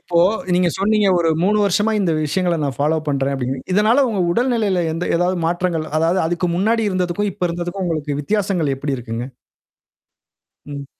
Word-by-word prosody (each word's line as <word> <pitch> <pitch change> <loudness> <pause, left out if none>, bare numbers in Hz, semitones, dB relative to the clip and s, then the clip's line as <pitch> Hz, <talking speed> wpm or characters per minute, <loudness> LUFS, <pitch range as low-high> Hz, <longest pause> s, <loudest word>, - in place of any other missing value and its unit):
இப்போ 170 - -1 0.4
நீங்க 180 0 +3
சொன்னீங்க 210 +1 +2
ஒரு 165 -1 +1
3 205 +4 +2
வருஷமா 205 +3 +1
இந்த 185 -5 +1
விஷயங்கள 175 +3 0
நான் 140 -3 -2
ஃபாலோ 155 +3 +1
பண்றேன் 140 -1 0
அப்டின்ங்கு. 130 0 -3
இதனால 220 +8 +4
உங்க 210 -5 -1
உடல்நிலையில 225 -6 +1
எந்த 165 +2 -3
ஏதாவது 180 +2 +1
மாற்றங்கள் 175 -2 -1
அதாவது 170 +4 +2
அதுக்கு 175 +2 -1
முன்னாடி 225 +4 +1
இருந்ததுக்கும், 185 +2 -1
இப்ப 180 - -14
இருந்ததுக்கும் 175 +3 -4
உங்களுக்கு 150 -4 -2
வித்தியாசங்கள் 190 -4 0
எப்படி 140 0 -3
இருக்குங்க? 115 -1 -5 1.4
ம். 140 -1 -7
175 Hz, 160 wpm, -19 LUFS, 150-200 Hz, 1.4 s, இதனால